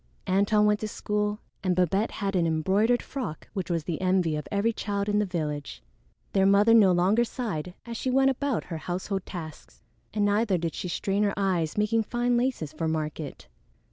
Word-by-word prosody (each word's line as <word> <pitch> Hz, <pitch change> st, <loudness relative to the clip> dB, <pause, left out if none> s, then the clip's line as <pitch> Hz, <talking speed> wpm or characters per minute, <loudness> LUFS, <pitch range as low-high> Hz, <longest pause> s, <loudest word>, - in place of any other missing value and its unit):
Antone 200 Hz, +3 st, +3 dB
went 210 Hz, 0 st, +3 dB
to 215 Hz, -, -3 dB
school, 210 Hz, 0 st, -1 dB, 0.3 s
and 185 Hz, -2 st, +1 dB
Babette 190 Hz, +5 st, +2 dB
had 200 Hz, -2 st, -3 dB
an 170 Hz, -2 st, +2 dB
embroidered 195 Hz, +9 st, +2 dB
frock 250 Hz, -, -5 dB
which 190 Hz, -3 st, -4 dB
was 165 Hz, -2 st, 0 dB
the 165 Hz, +1 st, -4 dB
envy 185 Hz, -4 st, +2 dB
of 150 Hz, -, -4 dB
every 205 Hz, +3 st, +1 dB
child 200 Hz, -1 st, -2 dB
in 210 Hz, 0 st, +2 dB
the 210 Hz, -, +1 dB
village. 150 Hz, -5 st, -4 dB, 0.5 s
Their 195 Hz, -1 st, +4 dB
mother 205 Hz, +3 st, +5 dB
no 210 Hz, -5 st, +7 dB
longer 190 Hz, +6 st, +3 dB
sighed 190 Hz, -, -4 dB
as 235 Hz, -1 st, -5 dB
she 260 Hz, -, -2 dB
went 270 Hz, +1 st, +4 dB
about 270 Hz, -1 st, -1 dB
her 165 Hz, -, -6 dB
household 185 Hz, +4 st, -4 dB
tasks, 160 Hz, -4 st, -9 dB, 0.3 s
and 205 Hz, -1 st, +1 dB
neither 205 Hz, -1 st, +2 dB
did 165 Hz, -2 st, -2 dB
she -, -, -4 dB
strain 195 Hz, +3 st, -1 dB
her 205 Hz, -1 st, +1 dB
eyes 185 Hz, -5 st, 0 dB
making 215 Hz, +2 st, +2 dB
fine 240 Hz, +2 st, 0 dB
laces 240 Hz, -, -1 dB
for 165 Hz, -, -2 dB
market. 155 Hz, -2 st, -4 dB
200 Hz, 190 wpm, -27 LUFS, 175-215 Hz, 0.5 s, no